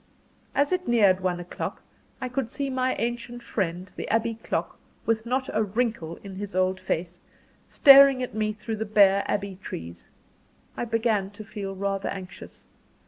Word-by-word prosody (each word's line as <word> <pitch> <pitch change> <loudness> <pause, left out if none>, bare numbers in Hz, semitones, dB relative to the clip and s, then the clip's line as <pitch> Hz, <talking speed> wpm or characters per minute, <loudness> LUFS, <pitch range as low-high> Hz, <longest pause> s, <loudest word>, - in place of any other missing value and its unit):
As 285 +3 +2
it 365 0 -1
neared 205 -6 +4
one 180 -1 -1
o'clock, 175 0 -6 0.4
I 255 - -3
could 250 -1 -2
see 275 +1 -3
my 255 0 0
ancient 240 +1 -4
friend 185 -4 -2
the - - -5
Abbey 230 +1 +1
clock 225 - -4 0.3
with 225 0 0
not 260 +2 0
a 215 - +2
wrinkle 215 -5 -1
in 195 -2 -8
his 205 -1 -6
old 185 0 +1
face, 175 -1 -3 0.5
staring 275 -2 +8
at 250 - -5
me 215 0 0
through 220 +1 -5
the 220 - -2
bare 200 -2 +5
Abbey 200 -2 -2
trees. 85 - -8 0.7
I - - -2
began 225 -4 0
to 205 +1 -10
feel 200 -2 -6
rather 195 0 -2
anxious. 185 -2 -9
215 Hz, 165 wpm, -26 LUFS, 190-240 Hz, 0.7 s, staring